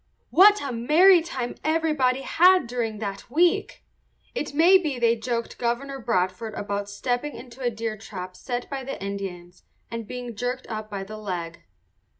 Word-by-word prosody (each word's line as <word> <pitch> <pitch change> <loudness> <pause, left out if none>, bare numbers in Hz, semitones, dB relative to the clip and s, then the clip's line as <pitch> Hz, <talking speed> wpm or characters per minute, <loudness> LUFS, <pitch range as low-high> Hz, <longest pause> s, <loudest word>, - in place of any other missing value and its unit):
What 410 +2 +7
a 275 - -3
merry 320 +10 +5
time 260 -7 -4
everybody 305 -5 +1
had 365 +2 +5
during 235 -2 -3
that 200 -1 -6
week! 340 +6 +1 0.5
It 300 -11 -3
may 340 +6 +6
be 300 -7 -2
they 235 -1 +3
joked 235 +1 -3
Governor 265 +3 -2
Bradford 215 -2 -1
about 205 0 -3
stepping 245 +7 -2
into 245 +1 -11
a 245 - +1
deer 225 -1 -4
trap 185 -4 -8
set 245 +2 -4
by 275 -1 -5
the 270 +1 -6
Indians 190 -3 -6 0.3
and 230 -2 -5
being 245 -1 -6
jerked 250 +4 -3
up 215 -1 -5
by 200 -2 -4
the 215 +2 -8
leg. 175 -5 -5
240 Hz, 160 wpm, -25 LUFS, 210-275 Hz, 0.5 s, What